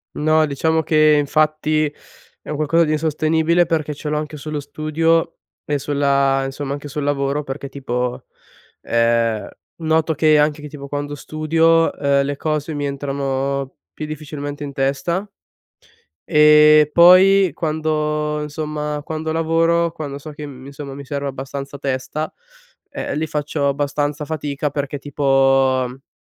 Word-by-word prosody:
No, 155 Hz, +1 st, +3 dB
diciamo 160 Hz, +3 st, 0 dB
che 155 Hz, -1 st, +4 dB
infatti, 155 Hz, +1 st, +1 dB, 0.6 s
è -, -, -13 dB
un 150 Hz, -, -3 dB
qualcosa 160 Hz, +3 st, +3 dB
di 155 Hz, -, 0 dB
insostenibile, 160 Hz, +2 st, +2 dB
perché 155 Hz, -2 st, -1 dB
ce 150 Hz, +1 st, -6 dB
l'ho 150 Hz, -, 0 dB
anche 150 Hz, 0 st, -4 dB
sullo 150 Hz, 0 st, -5 dB
studio 155 Hz, +3 st, 0 dB, 0.3 s
e 145 Hz, -1 st, -1 dB
sulla 140 Hz, -1 st, +1 dB
insomma 135 Hz, +1 st, -4 dB
anche 145 Hz, 0 st, -7 dB
sul 150 Hz, 0 st, -4 dB
lavoro; 140 Hz, +1 st, 0 dB
perché 140 Hz, 0 st, -6 dB
tipo, 125 Hz, -2 st, -3 dB, 0.6 s
ehm, 115 Hz, -1 st, +1 dB, 0.3 s
noto 160 Hz, 0 st, +1 dB
che 155 Hz, 0 st, +4 dB
anche 150 Hz, 0 st, +2 dB
che 150 Hz, -, -7 dB
tipo 140 Hz, -2 st, -9 dB
quando 145 Hz, 0 st, -4 dB
studio, 165 Hz, +2 st, +2 dB
uhm, 140 Hz, -1 st, +2 dB
le 145 Hz, +1 st, -2 dB
cose 155 Hz, +1 st, -2 dB
mi 145 Hz, -1 st, -3 dB
entrano 140 Hz, -1 st, -2 dB, 0.2 s
più 155 Hz, -, -6 dB
difficilmente 145 Hz, -1 st, -6 dB
in 140 Hz, -, -7 dB
testa, 140 Hz, +8 st, -1 dB, 1.0 s
e 150 Hz, 0 st, +6 dB
poi 185 Hz, +2 st, +6 dB
quando 150 Hz, -1 st, -1 dB
insomma 150 Hz, 0 st, -4 dB
quando 160 Hz, 0 st, -3 dB
lavoro, 165 Hz, +1 st, +1 dB
quando 145 Hz, -3 st, -6 dB
so 150 Hz, +2 st, -9 dB
che, 150 Hz, 0 st, -8 dB
mhmm, 130 Hz, -2 st, -11 dB
insomma 140 Hz, 0 st, -8 dB
mi 140 Hz, -1 st, -9 dB
serve 140 Hz, 0 st, -3 dB
abbastanza 135 Hz, +1 st, -6 dB
testa, 140 Hz, +3 st, -3 dB, 0.6 s
ehm, -, -, -4 dB
lì 155 Hz, -, -1 dB
faccio 145 Hz, -1 st, -1 dB
abbastanza 145 Hz, +1 st, -2 dB
fatica 150 Hz, -1 st, -3 dB
perché, 145 Hz, 0 st, -4 dB
tipo 145 Hz, 0 st, -6 dB
ho 135 Hz, -, +1 dB
150 Hz, 145 wpm, -20 LUFS, 140-155 Hz, 1.0 s, e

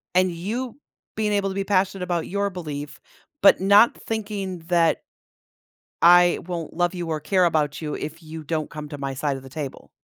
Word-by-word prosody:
and 185 Hz, 0 st, +4 dB
you 225 Hz, +10 st, -4 dB, 0.4 s
being 215 Hz, -1 st, 0 dB
able 200 Hz, -1 st, +1 dB
to 190 Hz, -, -5 dB
be 195 Hz, -, -1 dB
passionate 195 Hz, -1 st, +1 dB
about 175 Hz, -2 st, -2 dB
your 200 Hz, +1 st, -1 dB
belief, 145 Hz, -6 st, -6 dB, 0.4 s
but 200 Hz, -, +7 dB
not 200 Hz, +4 st, +6 dB
thinking 200 Hz, -4 st, -3 dB
that 170 Hz, -2 st, +3 dB, 1.0 s
I 175 Hz, 0 st, +7 dB
won't 170 Hz, -3 st, -5 dB
love 175 Hz, +1 st, +1 dB
you 175 Hz, -2 st, -4 dB
or 155 Hz, -2 st, -2 dB
care 185 Hz, +3 st, +2 dB
about 150 Hz, -3 st, 0 dB
you 150 Hz, -2 st, -3 dB
if 160 Hz, +2 st, -6 dB
you 160 Hz, 0 st, -8 dB
don't 155 Hz, 0 st, -2 dB
come 150 Hz, -1 st, -8 dB
to 145 Hz, -, -7 dB
my 135 Hz, -1 st, -4 dB
side 140 Hz, +1 st, -1 dB
of 135 Hz, -, -11 dB
the -, -, -11 dB
table. 140 Hz, -1 st, -7 dB
175 Hz, 190 wpm, -24 LUFS, 155-195 Hz, 1.0 s, but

